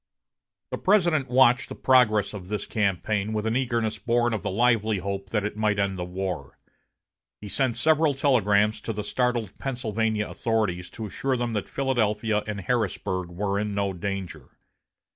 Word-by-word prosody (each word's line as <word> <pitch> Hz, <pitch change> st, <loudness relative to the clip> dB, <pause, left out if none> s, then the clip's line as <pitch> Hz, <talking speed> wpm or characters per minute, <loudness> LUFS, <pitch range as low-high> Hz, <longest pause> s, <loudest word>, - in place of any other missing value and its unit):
The -, -, -3 dB
President 170 Hz, -, +3 dB
watched 125 Hz, 0 st, +4 dB
the -, -, -6 dB
progress 110 Hz, -6 st, +3 dB
of 95 Hz, -3 st, -8 dB
this 105 Hz, +1 st, -3 dB
campaign 105 Hz, +1 st, -1 dB
with 105 Hz, 0 st, -2 dB
an 110 Hz, +1 st, 0 dB
eagerness 115 Hz, -4 st, 0 dB
born 120 Hz, +3 st, +1 dB
of 110 Hz, -, -2 dB
the -, -, -3 dB
lively 110 Hz, 0 st, +2 dB
hope 100 Hz, +1 st, -4 dB
that 105 Hz, -1 st, 0 dB
it 105 Hz, -, -3 dB
might 105 Hz, -1 st, +1 dB
end 100 Hz, -2 st, 0 dB
the -, -, -2 dB
war. 90 Hz, -6 st, -5 dB, 0.8 s
He 105 Hz, -, -8 dB
sent 130 Hz, +3 st, 0 dB
several 155 Hz, -2 st, +3 dB
telegrams 105 Hz, -6 st, +2 dB
to 115 Hz, -, -4 dB
the 105 Hz, 0 st, -4 dB
startled 120 Hz, -3 st, -1 dB
Pennsylvania 110 Hz, -4 st, -1 dB
authorities 105 Hz, -6 st, -1 dB
to 110 Hz, -, -4 dB
assure 130 Hz, +5 st, -1 dB
them 120 Hz, -1 st, -2 dB
that 105 Hz, -3 st, -3 dB
Philadelphia 110 Hz, -5 st, 0 dB
and 105 Hz, -2 st, -4 dB
Harrisburg 95 Hz, -4 st, -1 dB
were 100 Hz, +3 st, -1 dB
in 105 Hz, -1 st, -2 dB
no 100 Hz, -1 st, 0 dB
danger. 90 Hz, -6 st, -6 dB
105 Hz, 165 wpm, -26 LUFS, 100-120 Hz, 0.8 s, watched